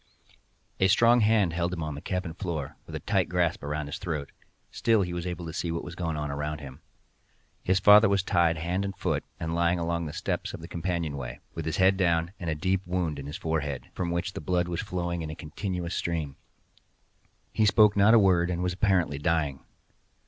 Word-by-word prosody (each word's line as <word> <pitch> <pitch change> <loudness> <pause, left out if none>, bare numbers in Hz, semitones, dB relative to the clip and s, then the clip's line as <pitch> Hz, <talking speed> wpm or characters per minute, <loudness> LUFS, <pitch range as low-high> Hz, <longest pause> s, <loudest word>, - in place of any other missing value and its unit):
A 95 - +5
strong 115 +4 +5
hand 105 -5 +3
held 85 +1 -1
him 85 -3 -3
on 75 -1 -3
the 70 - -7
cabin 90 -3 -3
floor, 80 -7 -4
with - - -7
a - - -3
tight - - +1
grasp 85 -1 +1
upon 75 +1 -3
his 70 - -6
throat; 80 -6 -4 0.4
still 115 -3 +2
he 90 -1 -4
was 85 +1 -3
able 90 -1 -4
to 80 - -6
see 85 0 -2
what 85 - -3
was 85 - -7
going 85 -3 -3
on 75 -1 -3
around 75 +1 -3
him. 70 -3 -10 0.8
His 95 +1 +2
father 105 +2 +7
was 100 -1 +2
tied 85 -3 +2
hand 90 +4 -1
and 100 -1 -4
foot, - - -1 0.2
and 80 0 -3
lying 85 +1 +2
along 85 -1 -1
the - - -5
steps - - -3
of - - -9
the - - -9
companion 85 -4 -2
way, 60 -2 -6
with 80 - -5
his 80 0 -2
head 95 +1 +4
down, 85 -2 +1
and 85 - -3
a 80 - 0
deep 95 +4 0
wound 90 -5 -1
in 70 - -7
the 75 - -6
forehead, 75 -4 -3
from 90 -2 -2
which 85 +2 -2
the - - -6
blood 90 +2 0
was 85 -1 -2
flowing 85 -4 -3
in 80 - -5
a 75 - -5
continued 90 +2 -4
stream. 80 -7 -2 1.2
He 110 - +3
spoke 105 0 +5
not 105 +3 +6
a - - +8
word, 90 -4 +4
and 90 0 -1
was 90 -1 0
apparently 90 -7 +1
dying. 75 -3 0
85 Hz, 220 wpm, -28 LUFS, 80-95 Hz, 1.2 s, a